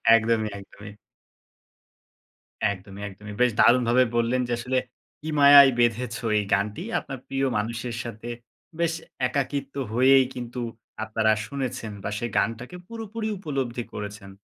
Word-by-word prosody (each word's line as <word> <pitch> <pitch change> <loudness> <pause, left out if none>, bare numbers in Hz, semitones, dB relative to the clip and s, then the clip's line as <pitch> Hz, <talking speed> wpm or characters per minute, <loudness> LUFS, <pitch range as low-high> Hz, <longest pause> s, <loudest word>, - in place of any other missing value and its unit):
একদমই, 110 -1 +1
একদমই। 100 +1 -12 1.8
একদমই, 100 +1 -9
একদমই 105 +1 -10
বেশ 125 -1 +5
দারুণভাবে 125 +1 +5
বললেন 120 +2 +2
যে 120 - -5
আসলে, 130 +2 -1 0.4
'কি 155 - -5
মায়ায় 140 -1 +9
বেঁধেছো' 120 0 0
এই 105 - +1
গানটি 105 - 0 0.2
আপনার 135 - -8
প্রিয় 135 0 0
মানুষের 115 +2 -3
সাথে 115 0 -7 0.5
বেশ 170 -1 +1 0.3
একাকিত্ব 140 +1 -2 0.2
হয়েই 130 +2 +6
কিন্তু 125 0 -6 0.4
আপনারা 110 0 +1 0.2
শুনেছেন 130 -4 -4
বা 105 - -2
সেই 120 +1 -3
গানটাকে 120 +8 -1
পুরোপুরি 225 -1 -5
উপলব্ধি 135 -8 -3
করেছেন। 105 -1 -7
120 Hz, 125 wpm, -25 LUFS, 110-135 Hz, 1.8 s, মায়ায়